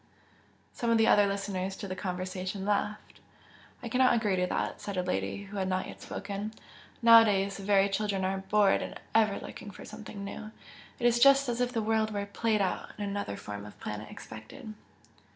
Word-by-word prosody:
Some 235 - -2
of 230 - +4
the 225 - +4
other 205 -2 +5
listeners 195 -1 -2
to 200 - -6
the 185 - -4
conversation 185 +1 -4
laughed. 210 +1 -2 0.6
"I - - -4
cannot 255 +3 +4
quite 235 - +3
agree 210 -4 +1
to 180 0 +1
that" - - -2
said 200 -2 -5
a 180 - +1
lady 185 +2 -2
who 200 +1 -8
had 190 -1 0
not 185 0 0
yet - - -10
spoken 205 +2 -5 0.5
"Nowadays 210 -4 +6
the 200 - -8
very 200 0 +4
children 200 -1 -1
are 190 0 -1
'bored' 200 +1 +3
and - - -6
ever 215 -2 +3
looking 205 - -9
for - - -11
something 215 -2 -8
new 215 +2 -7 0.5
it 240 - -3
is 240 0 +4
just 275 +1 +6
as 240 +1 -1
if 245 0 +1
the 225 -3 -1
world 220 0 +1
were 205 -1 -2
'played 215 +1 0
out' 190 - -1
and 205 -1 -3
another 200 - -3
form 100 -1 -7
of 105 - -12
planet 105 0 -6
expected." 215 - -10
200 Hz, 200 wpm, -30 LUFS, 190-220 Hz, 0.6 s, Nowadays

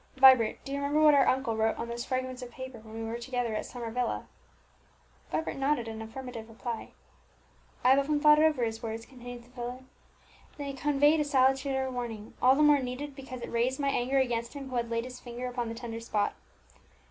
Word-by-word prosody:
"Vibert, 260 -4 +7
do 275 - -6
you 280 - -1
remember 285 +2 +1
what 305 -1 +7
our 275 -2 +5
uncle 260 -3 +1
wrote 220 0 +1
on 235 - -4
those 235 +1 -4
fragments 255 -1 -3
of 250 - -7
paper 260 -1 -8
when 220 0 -12
we 225 - -4
were 225 +1 -4
together 245 -2 -2
at 215 - -3
Summer 235 -2 -6
Villa?" 245 0 -1 1.1
Vibert 320 - -2
nodded 270 -3 +1
an 220 0 -6
affirmative 230 0 -7
reply. 230 0 -6 0.9
"I 250 - +6
have 270 - +6
often 295 +1 +1
thought 300 0 +7
over 310 -5 +3
his 225 0 -2
words," 225 -1 -5
continued 245 -2 -10
the 240 - -21
invalid; 250 +1 -6 0.7
"they 280 -1 -4
conveyed 290 +3 +3
a - - +3
salutary 265 -1 +2
warning, 235 -4 -5
all 260 +1 +6
the 300 - +3
more 295 -1 +6
needed 270 +2 -5
because 260 -2 -8
it - - -6
raised 245 +3 +1
my 280 -1 +1
anger 265 0 +1
against 235 -3 0
him 275 -2 -7
who - - -4
had 235 -1 -1
laid 230 0 -1
his 250 0 -8
finger 245 0 -6
upon 245 -2 -3
the 230 - -5
tender 230 -1 -6
spot. 215 -3 0
250 Hz, 210 wpm, -30 LUFS, 235-270 Hz, 1.1 s, Vibert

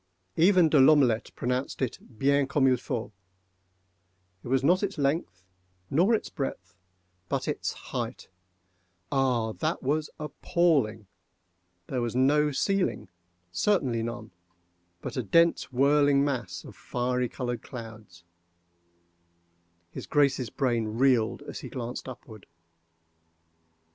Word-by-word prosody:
Even 180 0 +5
De 150 -2 +4
L'Omelette 130 -5 +5
pronounced 125 +2 -2
it 130 -3 -2 0.2
bien 140 +2 +2
comme 140 -1 +2
il 130 - +5
faut. 120 -3 -4 1.3
It - - -9
was 135 +1 +1
not 180 +6 +4
its 200 -1 -2
length 140 - -1 0.5
nor 185 +10 +4
its - - -3
breadth,—but 90 - -7
its - - -2
height—ah, 95 +7 -4
that 155 +8 -3
was 150 +3 0
appalling!—There 110 - -2
was 120 0 -2
no 150 +4 +3
ceiling—certainly 115 - -1
none—but 90 -6 -10
a - - +1
dense 165 - +2
whirling 140 +1 +4
mass 120 -11 -3
of - - -12
fiery 125 0 -2
colored 120 -2 -4
clouds. 110 -8 -10 1.7
His - - -8
Grace's 135 -5 +2
brain 120 -4 0
reeled 125 -4 +2
as - - -7
he - - -8
glanced 125 +1 -5
upward. 110 -4 -12
125 Hz, 105 wpm, -27 LUFS, 95-140 Hz, 1.7 s, Even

